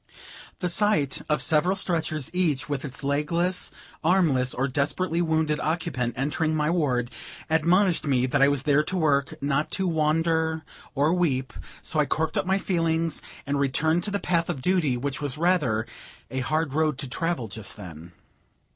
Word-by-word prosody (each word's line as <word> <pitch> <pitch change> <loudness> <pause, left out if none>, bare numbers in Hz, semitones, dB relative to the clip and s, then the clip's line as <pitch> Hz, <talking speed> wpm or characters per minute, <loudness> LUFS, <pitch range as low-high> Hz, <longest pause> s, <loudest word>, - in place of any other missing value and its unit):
The 180 - +1
sight 170 -8 +2
of 150 - +1
several 170 +5 +2
stretchers, 160 -6 0
each 155 -6 0
with 145 -3 -3
its 140 -1 -5
legless, 165 +6 0 0.3
armless, 155 -8 +3
or 135 +2 0
desperately 150 +6 0
wounded 160 -2 +1
occupant, 150 -7 -1
entering 155 +4 0
my 150 +1 +1
ward, 125 -8 0 0.4
admonished 170 +2 +3
me 130 -3 +2
that 130 - +1
I 140 - +7
was 140 -2 +1
there 145 0 +4
to 185 +5 -3
work, 145 -3 +1
not 140 +2 0
to 190 -2 0
wonder 160 0 +1 0.3
or 145 +4 +3
weep; 140 -8 0 0.3
so 155 - 0
I 150 - +3
corked 160 0 -1
up - - 0
my 190 +1 +3
feelings, 165 -4 0 0.2
and 140 +1 -1
returned 155 +5 +1
to - - -2
the 200 - 0
path 170 -2 0
of 140 -7 -3
duty, 170 -9 +2
which 140 +3 -3
was 145 -2 -2
rather 150 -11 +2 0.5
"a 130 - -2
hard 155 +2 -1
road 155 -2 +1
to 140 -1 -3
travel" 165 -2 -2
just 105 0 -6
then. 85 -3 -10
155 Hz, 170 wpm, -26 LUFS, 140-170 Hz, 0.5 s, I